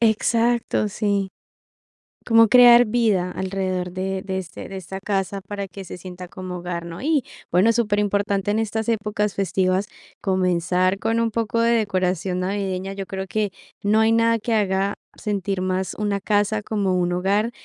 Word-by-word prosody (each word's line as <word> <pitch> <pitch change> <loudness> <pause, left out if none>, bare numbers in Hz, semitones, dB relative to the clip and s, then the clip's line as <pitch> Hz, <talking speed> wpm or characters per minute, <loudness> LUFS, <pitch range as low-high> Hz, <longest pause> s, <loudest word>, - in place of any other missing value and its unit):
Exacto, 230 0 +2
sí. 200 -1 -1 1.0
Como 225 -1 +6
crear 245 0 +8
vida 210 -6 +1
alrededor 185 -1 -2
de 190 +1 -3
de 190 -1 -3
este 175 -3 -7
de 195 - -8
esta 190 +1 -6
casa 195 0 -2
para 200 0 -5
que 195 0 -9
se 180 - -8
sienta 180 0 -9
como 185 0 -7
hogar, 175 -1 -5
¿no? 170 +4 -8
Y 295 -3 +1 0.3
bueno, 185 +6 +4
superimportante 205 -3 0
en 220 - +1
estas 220 +1 -2
épocas 210 -2 -1
festivas 190 0 0 0.3
comenzar 185 0 +1
con 225 +2 0
un 230 -1 0
poco 230 +1 0
de 230 0 +3
decoración 185 -4 0
navideña. 190 0 -2
Yo 195 0 -5
creo 190 +1 -5
que 210 -1 -1 0.3
no 215 +2 +3
hay 220 - +4
nada 230 0 +3
que 230 +2 -2
haga 195 -2 +1 0.2
sentir 200 -2 -2
más 185 0 -1
una 205 -1 -1
casa 205 +1 +1
como 205 -3 -1
un 175 0 +1
hogar, 200 +6 +1
200 Hz, 165 wpm, -22 LUFS, 185-220 Hz, 1.0 s, crear